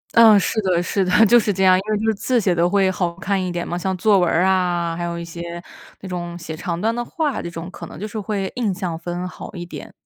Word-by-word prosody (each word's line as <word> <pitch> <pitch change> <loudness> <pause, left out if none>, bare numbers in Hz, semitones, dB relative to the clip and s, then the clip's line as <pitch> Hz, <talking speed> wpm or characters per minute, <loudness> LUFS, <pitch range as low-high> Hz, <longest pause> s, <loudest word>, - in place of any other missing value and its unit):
嗯， 220 -3 +8
是 220 +3 0
的 180 -3 +1
是 195 +1 0
的。 185 +5 +5
就 240 +3 +6
是 210 - 0
这 190 0 0
样， 185 0 +7
因 185 - +1
为 215 - +2
就 220 - -3
是 220 - +3
字 245 +4 0
写 185 -4 +2
得 175 +1 +2
会 195 -1 +3
好 175 -2 -1
看 190 +2 -1
一 180 - -2
点 175 0 -3
嘛， 175 - -3
像 185 +2 -2
作 205 -1 +4
文 175 - +2
儿 175 +3 +2
啊， 175 -3 +1
还 175 - -4
有 170 0 -3
一 170 - -5
些， 170 +1 -7 0.4
那 195 - -7
种 175 -1 -5
写 165 -2 -7
长 170 +1 -4
段 225 +3 +1
的 240 - -2
话， 305 0 -2
这 - - -5
种 170 +1 -7
可 - - -9
能 - - -11
就 210 - -4
是 215 +1 -5
会 200 -2 -3
印 235 -5 0
象 180 -3 -4
分 175 +1 -4
好 - - -9
一 175 -1 -6
点。 175 - -9
185 Hz, 305 characters per minute, -21 LUFS, 175-205 Hz, 0.4 s, 嗯